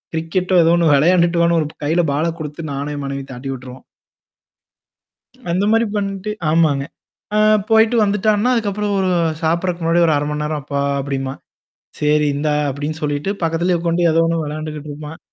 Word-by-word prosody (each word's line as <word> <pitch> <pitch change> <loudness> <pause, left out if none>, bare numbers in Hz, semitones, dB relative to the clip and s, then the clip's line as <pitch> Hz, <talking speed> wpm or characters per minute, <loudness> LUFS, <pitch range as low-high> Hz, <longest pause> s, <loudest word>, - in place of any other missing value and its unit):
Cricket 170 +3 -2
to 185 - +5
ஏதோ 165 - +4
1 165 -3 +3
வெளையாண்டுட்டு 170 +3 +3
வான்னு 170 0 +3
ஒரு 150 - -2 0.2
கையில 165 +4 +2
பால 150 +3 0
குடுத்து 155 +1 -6
நானும் 140 +2 -4
என் 145 - -5
மனைவியும் 140 0 -5
தட்டி 125 +2 -7
விட்டுருவோம். 125 0 -10 1.7
அந்த 185 +3 +1
மாரி 225 +1 +3
பண்ணட்டு 200 0 -3 0.2
ஆமாங்க. 155 -4 +2 0.5
அ - - +3 0.3
போயிட்டு 225 +1 +4
வந்துட்டான்னா, 210 +3 +1
அதுக்கப்புறம் 210 -2 -1
ஒரு 185 - +1 0.3
சாப்பறதுக்கு 170 +2 0
முன்னாடி 170 +1 +3
ஒரு 155 - +3
1/2 145 - -1
மணி 150 - -3
நேரம் 150 0 -3
அப்பா 140 0 -2 0.2
அப்டிம்பான். 135 -1 -4 0.6
"சரி 150 0 +2
இந்தா" 150 +1 0 0.2
அப்டின்னு 150 +3 -4
சொல்லிட்டு 145 +5 -1
பக்கத்திலேயே 170 +2 +1
உக்கான்ட்டு 170 0 +1
ஏதோ 165 +1 +3
1 165 -1 0
வெளையாண்டுகிட்டு 155 0 -6
இருப்பான். 150 +2 -9
160 Hz, 165 wpm, -19 LUFS, 150-180 Hz, 1.7 s, to